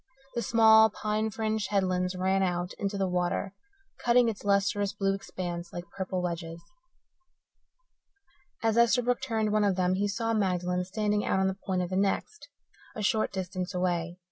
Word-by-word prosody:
The 235 - -1
small, 220 -1 +6
pine 215 +1 -2
fringed 220 -1 -2
headlands 185 -2 0
ran 190 +1 +1
out 180 -1 -1
into 200 0 -2
the 195 -1 0
water, 180 +2 -1 0.5
cutting 240 0 +4
its 215 - -6
lustrous 200 0 +1
blue 195 -1 0
expanse 175 -3 -5
like 175 0 -8
purple 185 -1 -3
wedges. 170 -1 -4 2.0
As 225 0 +2
Esterbrook 245 +1 +3
turned 220 -4 -1
one 215 0 +2
of 200 -2 +2
them 180 0 +1
he 200 +2 0
saw 225 +3 -1
Magdalen 180 -3 0
standing 210 +1 -1
out - - +1
on 190 - +2
the 190 - +1
point 185 -1 0
of 180 - -5
the 185 - 0
next, 200 - -1 0.5
a 215 - -4
short 215 +2 +1
distance 185 0 -4
away. 175 -1 -1
195 Hz, 165 wpm, -28 LUFS, 180-215 Hz, 2.0 s, small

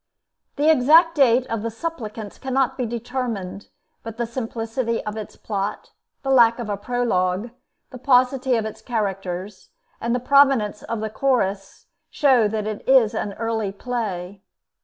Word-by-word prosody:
The 300 +2 +4
exact 320 +5 +5
date 260 -4 +4
of 225 -3 -3
the 230 - -2
'Suppliants' 225 -5 -6
cannot 265 -1 0
be 250 - -2
determined; 230 -5 -4 0.3
but 225 -1 -8
the 240 - -1
simplicity 230 0 -3
of 210 - -4
its 215 -2 -7
plot, 200 -2 -4 0.3
the 270 - -1
lack 235 -3 +5
of 235 -3 -5
a 205 - 0
prologue, 205 -2 -1 0.4
the 255 - -9
paucity 255 0 +3
of 220 - -2
its 220 - -7
characters, 195 -4 -4 0.3
and 235 +1 0
the - - 0
prominence 255 -5 +3
of 230 -2 -4
the 220 -1 -3
Chorus, 205 -7 -1 0.2
show 260 -7 +3
that 215 0 -3
it 215 -1 -5
is 255 -5 +5
an 205 - -3
early 220 -2 -2
play. 200 -4 -4
230 Hz, 155 wpm, -22 LUFS, 210-255 Hz, 0.4 s, exact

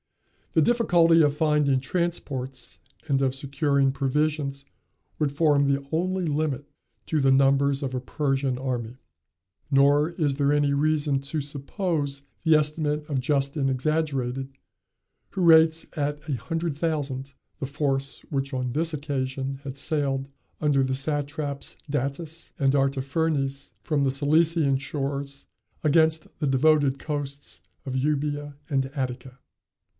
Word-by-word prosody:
The 160 - +4
difficulty 170 -7 +4
of 145 -1 +2
finding 150 -4 +3
transports 135 -4 -3 0.3
and 135 -2 +2
of 130 -1 +1
securing 140 0 +1
provisions 140 0 -1 0.5
would 150 -3 +1
form 145 -1 +3
the 140 0 0
only 185 +3 0
limit 145 -2 -1 0.4
to 155 -2 0
the 135 0 +4
numbers 140 +1 +3
of 130 -1 -3
a 125 - -2
Persian 135 -1 -1
army. 125 -2 -3 0.7
Nor 145 +2 +4
is 155 -5 0
there 140 0 +2
any 145 -1 +2
reason 145 -1 +1
to 140 +3 -3
suppose 145 0 -2 0.2
the 160 -2 +5
estimate 150 0 0
of 135 -3 0
Justin 140 0 0
exaggerated, 135 -2 -1 0.8
who 190 - -4
rates 160 -1 +6
at 145 0 -3
a 145 - -1
hundred 165 +4 -2
thousand 140 -4 -2 0.3
the 135 - -3
force 140 -1 -2
which 135 -1 -2
on 125 -2 -2
this 160 +3 0
occasion 135 -2 -3
had 135 -1 -6
sailed, 135 -2 0 0.3
under 145 -3 +2
the 130 0 0
satraps 145 0 -3
Datis 150 +4 -3
and 135 -1 +3
Artaphernes, 140 +1 0
from 150 -3 0
the 135 - +2
Cilician 150 +1 +3
shores 140 0 -4 0.4
against 160 +1 +3
the 150 - 0
devoted 140 0 +3
coasts 145 -2 -5 0.2
of 130 -2 -4
Euboea 145 +1 -1
and 135 -2 +1
Attica. 130 -2 -5
140 Hz, 130 wpm, -26 LUFS, 135-155 Hz, 0.8 s, rates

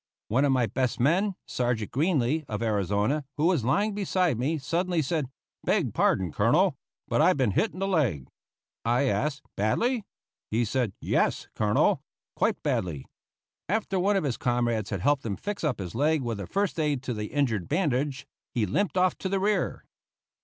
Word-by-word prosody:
One 130 +6 +3
of 140 - +3
my 130 -2 +3
best 125 +4 -1
men, 180 - +2
Sergeant 120 -4 -1
Greenly, 155 -1 +1
of 105 +1 -3
Arizona, 105 - +1
who 150 - +1
was 170 -8 +3
lying 200 - +1
beside 185 - +1
me, 150 +6 0
suddenly 170 +3 0
said, 150 -2 -1 0.3
"Beg - - +1
pardon, 90 -4 +2
Colonel; 150 - +3 0.3
but - - +2
I've 180 0 +4
been 130 -6 +2
hit 215 - +1
in - - -12
the 195 +1 -1
leg." 125 - +1 0.6
I 120 +3 +2
asked, 140 +1 0
"Badly?" 225 - +1 0.5
He 115 +2 +1
said, 115 -2 -1
"Yes, - - 0
Colonel; 105 -1 +2 0.3
quite - - 0
badly." 75 -7 -1 0.6
After 195 -2 0
one 200 +3 +2
of 195 - +1
his 135 -5 -1
comrades 120 -4 0
had 100 -4 -3
helped 145 +4 +2
him 105 -4 -2
fix 205 - -5
up 150 -5 0
his 90 -3 -6
leg 150 +3 +2
with 115 -3 -3
a 100 - -5
first 200 -4 -1
aid 145 -4 0
to 125 - -2
the 105 -1 -3
injured 115 -10 0
bandage, 145 -5 0 0.3
he 115 -3 +2
limped 185 - 0
off 185 0 +3
to 190 - -2
the 195 0 +1
rear. 205 +2 0
140 Hz, 180 wpm, -27 LUFS, 115-175 Hz, 0.6 s, I've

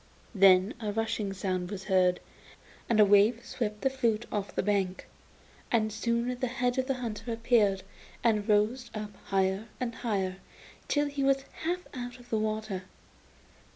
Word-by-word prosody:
Then 195 0 +6
a 215 -3 -2
rushing 220 -2 -1
sound 185 -2 -2
was 195 -2 -5
heard, 185 -2 +3 0.7
and 230 -2 +3
a 210 - +9
wave 205 +4 +4
swept 210 -3 -3
the 270 - +3
flute 235 -4 0
off 205 -2 -3
the - - +1
bank, 195 -2 0 0.7
and 215 -2 +2
soon 235 +2 -1
the 255 - 0
head 250 0 0
of 260 - 0
the 270 - +1
hunter 235 -1 -5
appeared 225 -4 +2 0.4
and 220 -2 +2
rose 215 +4 +2
up 210 -1 -5
higher 195 +2 0
and 245 -2 -2
higher 195 -6 -2 0.5
till 290 0 +2
he 285 -1 -2
was 270 0 +3 0.2
half 360 +2 -1
out 245 -1 -6
of 245 0 -17
the 220 - +2
water. 215 -3 -2
215 Hz, 160 wpm, -29 LUFS, 200-245 Hz, 0.7 s, a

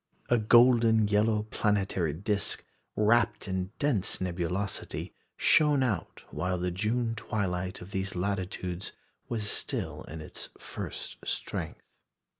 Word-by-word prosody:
A 120 - +4
golden 115 -1 +6
yellow 105 +1 +3
planetary 95 -6 +1
disc, 100 +4 -1 0.3
wrapt 110 0 +3
in 95 0 -2
dense 130 -10 +1
nebulosity, 90 +2 -2 0.2
shone 150 -3 +4
out 105 -10 -2
while 90 +4 -1
the 90 0 -1
June 115 +5 0
twilight 95 -4 -2
of 90 +2 -10
these 95 -1 -2
latitudes 90 -1 -2 0.4
was 110 -3 -2
still - - -2
in 80 - -7
its 80 - -7
first - - -6
strength. - - -3
100 Hz, 115 wpm, -29 LUFS, 90-110 Hz, 0.4 s, golden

